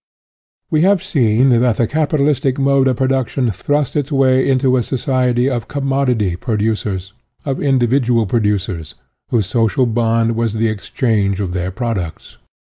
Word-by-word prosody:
~ -, -, -55 dB
We 155 Hz, -, +2 dB
have 190 Hz, +1 st, +3 dB
seen 130 Hz, -, +2 dB
that 120 Hz, -1 st, +2 dB
the 120 Hz, -, +2 dB
capitalistic 145 Hz, -2 st, 0 dB
mode 135 Hz, -1 st, +2 dB
of 130 Hz, -2 st, 0 dB
production 130 Hz, -2 st, 0 dB
thrust 145 Hz, +9 st, -1 dB
its 145 Hz, 0 st, -1 dB
way 130 Hz, -1 st, +2 dB
into 130 Hz, -1 st, +2 dB
a 125 Hz, -, +2 dB
society 125 Hz, 0 st, 0 dB
of 120 Hz, -5 st, -2 dB
commodity 135 Hz, -9 st, 0 dB
producers, 105 Hz, -3 st, -2 dB, 0.3 s
of 135 Hz, -2 st, -2 dB
individual 125 Hz, -3 st, +2 dB
pro 115 Hz, +4 st, 0 dB
ducers, 95 Hz, -6 st, -2 dB, 0.3 s
whose 110 Hz, -4 st, +1 dB
social 115 Hz, +6 st, +1 dB
bond 115 Hz, 0 st, +1 dB
was 115 Hz, -1 st, -1 dB
the 110 Hz, 0 st, 0 dB
exchange 105 Hz, -2 st, -1 dB
of 95 Hz, -3 st, -3 dB
their 90 Hz, 0 st, -2 dB
products. 95 Hz, -5 st, -5 dB
120 Hz, 150 wpm, -17 LUFS, 110-135 Hz, 0.3 s, have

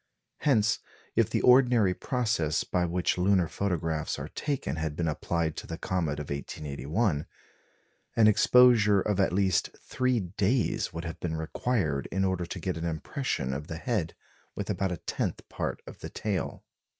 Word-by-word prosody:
Hence, 110 Hz, -7 st, +3 dB, 0.4 s
if -, -, +3 dB
the -, -, 0 dB
ordinary 125 Hz, -6 st, +5 dB
process 110 Hz, -, 0 dB
by 90 Hz, -1 st, 0 dB
which 90 Hz, +1 st, 0 dB
lunar 90 Hz, -1 st, +3 dB
photographs 80 Hz, -5 st, -2 dB
are -, -, -6 dB
taken 130 Hz, -, -3 dB
had 80 Hz, -1 st, -2 dB
been 85 Hz, 0 st, -1 dB
applied 80 Hz, +1 st, -1 dB
to -, -, -6 dB
the 80 Hz, -, -5 dB
comet 80 Hz, -6 st, -1 dB
of 75 Hz, -, -6 dB
1881, 75 Hz, -, -2 dB, 0.9 s
an 110 Hz, -2 st, +6 dB
exposure 110 Hz, -2 st, +6 dB
of 100 Hz, 0 st, 0 dB
at 95 Hz, -, +3 dB
least 95 Hz, 0 st, +1 dB
three 130 Hz, -2 st, 0 dB
days 100 Hz, +6 st, 0 dB
would 85 Hz, +1 st, -6 dB
have 80 Hz, -, -6 dB
been 80 Hz, -2 st, -2 dB
required 80 Hz, -, -1 dB
in 95 Hz, 0 st, +1 dB
order 95 Hz, -2 st, -1 dB
to -, -, -5 dB
get 90 Hz, -3 st, -2 dB
an 80 Hz, -, -4 dB
impression 80 Hz, -, -2 dB
of 70 Hz, +3 st, -5 dB
the 80 Hz, -, -5 dB
head 90 Hz, -4 st, -2 dB, 0.4 s
with -, -, -3 dB
about 95 Hz, -2 st, -1 dB
a 90 Hz, -, -2 dB
tenth -, -, -3 dB
part -, -, -4 dB
of -, -, -11 dB
the -, -, -7 dB
tail. 100 Hz, -4 st, -3 dB
90 Hz, 165 wpm, -28 LUFS, 80-110 Hz, 0.9 s, an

